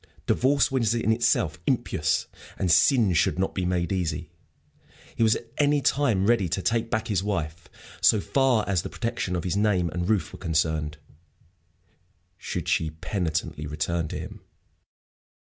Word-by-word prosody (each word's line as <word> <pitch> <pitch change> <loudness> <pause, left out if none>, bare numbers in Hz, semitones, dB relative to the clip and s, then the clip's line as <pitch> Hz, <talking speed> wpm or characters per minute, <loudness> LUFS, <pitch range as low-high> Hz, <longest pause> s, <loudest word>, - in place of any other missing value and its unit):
Divorce 140 +2 +2
was 120 -4 +1
in 115 -1 +1
itself 110 -9 +1
impious, - - 0 0.3
and 90 - +1
sin 115 - +4
should 80 - +2
not 95 +1 -1
be 95 - -2
made 90 -2 -1
easy. 90 -4 -2 0.8
He - - -4
was 110 -1 +4
at 115 -1 -8
any 145 0 +3
time 130 -9 +1
ready 105 -5 +2
to 95 - -1
take 115 0 0
back 110 -1 -1
his 100 -4 +1
wife, 85 -5 -3 0.3
so 110 - +5
far 125 +4 +1
as 95 -3 +1
the - - -6
protection 115 -6 -3
of 85 - -2
his 90 0 -1
name 100 -4 +2
and 90 +3 -3
roof 105 -4 0
were - - -9
concerned, 80 -3 -1 1.4
should - - -4
she 80 - +1
penitently 80 -2 -3
return 75 +2 -2
to - - -5
him. - - -8
95 Hz, 160 wpm, -26 LUFS, 85-115 Hz, 1.4 s, so